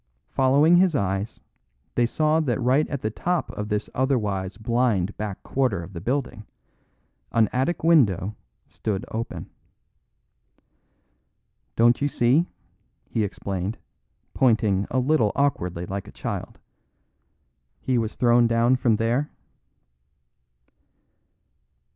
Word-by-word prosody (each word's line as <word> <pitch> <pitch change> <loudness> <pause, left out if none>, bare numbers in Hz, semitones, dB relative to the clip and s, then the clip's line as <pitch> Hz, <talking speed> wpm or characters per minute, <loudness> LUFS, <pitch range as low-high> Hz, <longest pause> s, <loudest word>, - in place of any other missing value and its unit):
Following 140 +6 +4
his 180 -3 +3
eyes, 100 -1 -2 0.5
they 120 -1 +2
saw 155 +5 +1
that 140 -6 0
right 130 +4 +2
at 140 -2 -4
the 110 - -1
top 175 +9 -2
of 105 0 -5
this 105 0 -1
otherwise 105 -8 -1
blind 115 -4 0
back 105 -3 -5
quarter 125 -10 0
of 90 +4 -11
the 85 - -6
building, 125 0 -2 0.9
an 115 -2 +3
attic 135 +7 -1
window 110 - +3 0.3
stood 105 +1 -4
open. 115 +1 -5 2.2
"Don't 120 +2 +4
you 145 - +2
see," 140 +6 +2 0.6
he 110 - 0
explained, 100 0 -4 0.6
pointing 110 -6 +2
a 130 - -1
little 130 -5 +2
awkwardly 90 -12 -1
like 100 +2 -5
a - - -10
child, - - -5 1.2
"he 130 -2 0
was 110 -1 -3
thrown 120 -1 +4
down 115 +2 +3
from 120 -3 +2
there?" 120 +7 0
120 Hz, 115 wpm, -24 LUFS, 105-135 Hz, 2.2 s, Following